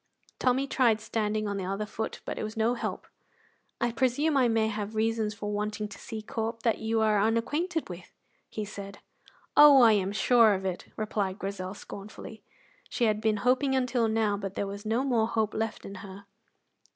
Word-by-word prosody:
Tommy 260 +2 +2
tried 245 -5 +2
standing 215 -1 -1
on 200 0 -2
the 195 - -3
other 195 +3 -2
foot, 220 +1 -5
but - - -4
it - - -3
was 215 +1 -6
no 225 +2 +2
help. 245 - -4 0.7
"I 240 0 +1
presume 265 +5 +1
I 260 -3 +4
may 225 -1 +2
have 215 0 -4
reasons 220 -1 0
for 205 0 -4
wanting 210 0 -2
to - - -11
see 220 -1 -7
Corp 225 +1 -4
that 230 -2 +1
you 220 0 0
are 215 -1 +3
unacquainted 295 - 0
with," 175 -1 -10 0.4
he 215 - -4
said. 200 -1 -8 0.6
"Oh, 285 -3 +9
I 230 - +8
am 195 -2 +1
sure 225 0 +5
of 190 0 -5
it!" 185 -2 -3
replied 205 -3 -2
Grizel, 195 -1 -5
scornfully. 210 +2 -10 0.5
She - - -2
had 215 -2 +2
been 220 -1 +2
hoping 265 +2 +3
until 250 -3 +1
now, 220 -2 +1
but 195 -1 -6
there - - -1
was 200 +2 -7
no 230 +4 +1
more 235 -5 +2
hope 220 -2 0
left 220 0 -3
in 195 - -7
her. 195 0 -10
220 Hz, 190 wpm, -28 LUFS, 205-235 Hz, 0.7 s, Oh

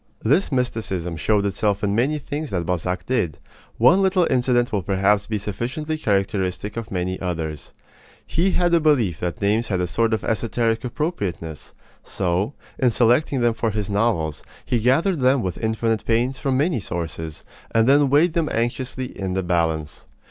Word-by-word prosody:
This 145 - +2
mysticism 110 -9 -2
showed 100 +6 +1
itself 100 +1 0
in 100 -1 +1
many 130 +8 +1
things 145 +1 -5
that 90 -3 -2
Balzac 90 +1 -2
did. 90 - -1 0.4
One 145 +12 +5
little 190 -2 +3
incident 125 -1 +2
will 105 - 0
perhaps 100 +2 +1
be 110 - -1
sufficiently 120 - -3
characteristic 100 - -1
of 115 -2 -5
many 95 0 -2
others. 80 -4 -4 0.5
He 175 +5 +1
had 175 -1 +2
a 170 - +6
belief 125 - +2
that 90 -1 -3
names 110 +3 +2
had 95 -3 -1
a 90 - +1
sort 115 +6 0
of - - -6
esoteric 115 +1 0
appropriateness. 100 - -4 0.3
So, 95 +7 -1 0.2
in 130 - +4
selecting 125 +4 +2
them 120 -1 +3
for 115 0 -1
his 105 -1 -3
novels, 100 - 0 0.2
he 125 -2 +1
gathered 145 - +2
them 130 -1 +3
with 90 -2 -3
infinite 110 -1 0
pains 120 +3 0
from 135 -3 0
many 155 -1 +1
sources, 80 -4 -5 0.3
and 115 +1 +2
then 140 0 +5
weighed 155 +5 +4
them 165 -3 0
anxiously 125 +2 -2
in 95 -6 -5
the 95 - 0
balance. 80 -3 -1
110 Hz, 170 wpm, -22 LUFS, 95-130 Hz, 0.5 s, a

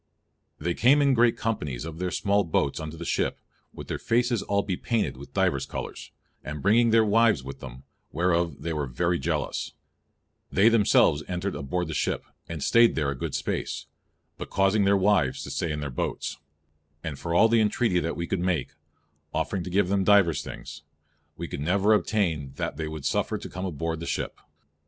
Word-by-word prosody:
"They 85 +3 -1
came 130 +10 +4
in 140 -2 +4
great 120 -1 +3
companies 75 - -3
of 80 0 -7
their 90 0 -1
small 100 +2 +1
boats 80 -5 0
unto 80 +1 -6
the 85 - -6
ship, - - 0 0.3
with - - -10
their - - -3
faces 120 -1 +1
all 100 0 0
bepainted 105 - -1
with 70 +2 -12
divers - - +1
colours, - - -6 0.3
and 75 +1 -5
bringing 115 +4 +4
their 110 0 +5
wives 105 - +3
with 70 +1 -8
them, 65 +1 -10 0.3
whereof 85 -1 0
they 85 - -2
were 75 -3 -2
very 85 +8 0
jealous; 65 - -2 0.8
they 100 +4 +5
themselves 105 -9 +4
entring 90 +2 -2
aboard 90 +5 -2
the 80 - -4
ship, - - -1 0.2
and 80 -4 -4
staying 115 0 +5
there 75 -3 0
a - - -4
good - - -4
space, - - -3 0.5
but - - -6
causing 95 +1 +2
their 100 0 +4
wives 95 -9 +2
to - - -7
stay 85 - -2
in 75 0 -3
their 70 -2 -4
boats; 65 - -3 0.7
and 80 -5 -5
for 85 0 -2
all 110 +6 +6
the 115 0 +3
entreatie 105 -3 +2
that 85 - -3
we 85 - -2
could 95 - -2
make, 90 -6 0 0.7
offering 95 - -1
to 90 - -6
give 95 +1 +2
them 100 -1 +2
divers 95 -6 +4
things, 75 +1 -9 0.6
we 85 - -5
could 70 - -6
never 100 +7 +3
obtaine 85 -11 0
that - - -3
they 80 +1 -4
would 75 -2 -7
suffer - - 0
them - - -5
to - - -6
come 90 +1 -5
aboard 80 -1 -3
the 85 - -6
ship. - - -3
90 Hz, 195 wpm, -26 LUFS, 80-105 Hz, 0.8 s, all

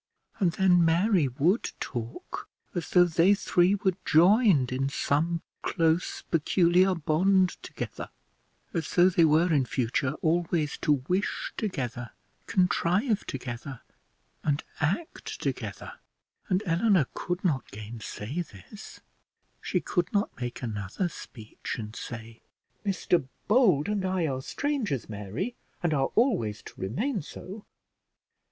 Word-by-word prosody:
And 180 -5 +2
then 180 0 +4
Mary 170 0 +3
would 155 - +1
talk 120 -2 -6 0.2
as 175 - -3
though 180 - +6
they 175 +3 +4
three 190 -1 +3
were 190 -1 +1
joined 175 - +5
in 135 +2 0
some 160 +4 0 0.2
close 165 +1 0
peculiar 180 +3 +3
bond 180 +4 +3
together; - - -6 0.6
as 165 -3 -2
though 180 +1 +7
they 170 -2 +5
were 160 +3 +4
in 140 -3 +4
future 130 +2 0
always 165 -2 +1
to 145 -5 +2
wish 185 +3 -1
together, 125 - -4 0.3
contrive 190 +4 +1
together, 130 0 -6 0.6
and 145 -1 0 0.2
act 180 - -2
together; - - -4 0.6
and 185 +2 +1
Eleanor 175 -1 +3
could 175 +1 -3
not 150 -9 0
gainsay 110 - -6
this; 165 - -11 0.6
she - - 0
could 175 -2 -1
not 205 +1 0
make 120 +1 -4
another 105 - -2
speech, 110 -8 -8
and 110 -1 -7
say, 115 -2 -8 0.4
"Mr 180 -7 +1 0.2
Bold 205 - +4
and 205 -2 -1
I 185 -2 0
are 130 -3 -2
strangers, 240 - -2
Mary, 110 - -4 0.3
and 170 -2 +2
are 135 -2 +1
always 120 - +1
to - - -12
remain 205 - -1
so!" 195 +7 -10
165 Hz, 125 wpm, -28 LUFS, 130-190 Hz, 0.6 s, though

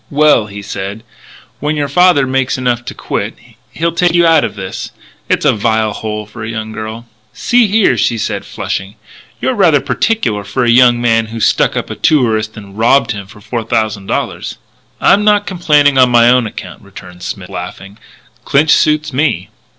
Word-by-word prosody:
"Well," 145 -7 +3
he 100 0 -9
said, 100 +2 -6 0.6
"when 150 +2 -1
your 145 -1 -1
father 165 -1 +4
makes 130 0 -1
enough 125 -2 -1
to - - -7
quit, - - -4 0.3
he'll 170 +1 -2
take 170 +1 +1
you 170 0 +4
out 165 -2 +4
of - - -3
this. 95 -2 -6 0.4
It's - - +1
a - - +4
vile 110 0 0
hole 105 0 -5
for 110 +1 -10
a 110 - -5
young 110 -1 -5
girl 110 +2 -7 0.2
" - - -39
"See 240 -2 +2
here," 210 0 +3
she 115 - +1
said, 105 -2 -3
flushing; 95 +3 -5 0.4
"you're 260 - 0
rather 175 - +4
particular 130 - -1
for 100 +6 -2
a 120 - +3
young 120 0 +5
man 115 -1 +1
who 115 +1 -7
stuck - - +2
up - - -4
a - - -4
tourist 110 -7 +1
and 100 0 -11
robbed 125 +3 +3
him 100 -3 -6
of 105 - -16
four 120 0 -3
thousand 110 -3 -2
dollars." - - -3 0.4
"I'm 205 - +4
not 210 -1 +3
complaining 150 -6 +2
on 130 -1 +6
my 120 0 +5
own 125 -2 +2
account," - - -9
returned 90 0 -13
Smith, - - -6
laughing; 100 +3 -8 0.4
"Clinch's 150 +2 +3
suits 155 -1 +1
me." 130 - 0
120 Hz, 190 wpm, -14 LUFS, 110-150 Hz, 0.6 s, on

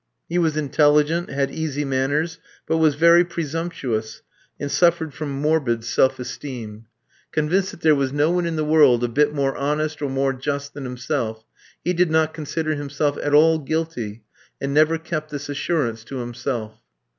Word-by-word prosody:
He 175 +1 0
was 160 -3 +1
intelligent, 150 +3 +2
had 140 -1 -1
easy 150 -2 -2
manners, 145 +5 0 0.3
but 160 - +1
was 155 -3 +3
very 170 +3 +6
presumptuous, 155 -10 -4 0.4
and 140 0 -3
suffered 170 -3 +2
from 150 +1 -5
morbid 140 -7 +1
self 130 +2 +2
esteem. 115 -4 -7 0.4
Convinced 180 +5 +1
that - - -11
there 155 -1 +5
was 135 -2 0
no 145 +3 +2
one 175 -1 +1
in 165 - -2
the 155 -1 -1
world 145 -6 +5
a - - +2
bit 145 +5 +2
more 140 -2 0
honest 150 +2 -1
or 145 - -1
more 135 0 0
just 140 +2 -4
than 145 -2 -7
himself, 125 -3 -3 0.4
he 180 - +2
did 180 -1 +2
not 160 0 +2
consider 155 0 -2
himself 145 0 -1
at 145 0 +1
all 160 +1 +5
guilty, 135 -8 -3 0.4
and 140 0 -2
never 155 +2 +4
kept 160 -1 -4
this 145 -1 -6
assurance 140 -6 -1
to 135 - -6
himself. 120 -2 -4
145 Hz, 170 wpm, -22 LUFS, 135-160 Hz, 0.4 s, very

